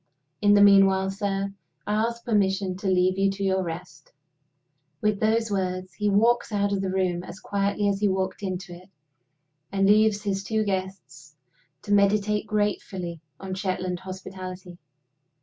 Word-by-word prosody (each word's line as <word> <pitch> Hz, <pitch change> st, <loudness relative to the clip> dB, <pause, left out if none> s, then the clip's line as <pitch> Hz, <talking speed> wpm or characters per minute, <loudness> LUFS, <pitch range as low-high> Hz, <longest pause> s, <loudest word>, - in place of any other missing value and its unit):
In 205 Hz, 0 st, +5 dB
the 205 Hz, -, +7 dB
meanwhile, 195 Hz, -1 st, +5 dB
sir, 195 Hz, -1 st, -2 dB, 0.3 s
I 210 Hz, -, -1 dB
ask 235 Hz, +2 st, -1 dB
permission 195 Hz, -4 st, +1 dB
to 195 Hz, -, -4 dB
leave 185 Hz, 0 st, +2 dB
you 195 Hz, 0 st, +3 dB
to 195 Hz, 0 st, -4 dB
your 190 Hz, -1 st, +1 dB
rest." 175 Hz, +1 st, -7 dB, 0.9 s
With 210 Hz, +1 st, 0 dB
those 225 Hz, 0 st, +1 dB
words, 185 Hz, -1 st, -2 dB
he 210 Hz, +3 st, -1 dB
walks 230 Hz, +4 st, +2 dB
out 200 Hz, -1 st, 0 dB
of 195 Hz, -, 0 dB
the 190 Hz, -, -2 dB
room 185 Hz, -2 st, 0 dB
as 190 Hz, -, -10 dB
quietly 200 Hz, 0 st, -1 dB
as 200 Hz, -1 st, 0 dB
he 210 Hz, -, +2 dB
walked 190 Hz, 0 st, -1 dB
into 185 Hz, -2 st, -4 dB
it, 180 Hz, +2 st, -13 dB, 0.8 s
and 195 Hz, 0 st, +1 dB
leaves 210 Hz, 0 st, +4 dB
his 195 Hz, -1 st, -2 dB
two 220 Hz, +2 st, 0 dB
guests 185 Hz, -7 st, -5 dB, 0.5 s
to 205 Hz, -, -1 dB
meditate 205 Hz, +1 st, +2 dB
gratefully 190 Hz, -5 st, -2 dB, 0.2 s
on 190 Hz, -1 st, -6 dB
Shetland 185 Hz, -2 st, -2 dB
hospitality. 185 Hz, -1 st, -8 dB
195 Hz, 155 wpm, -25 LUFS, 185-205 Hz, 0.9 s, the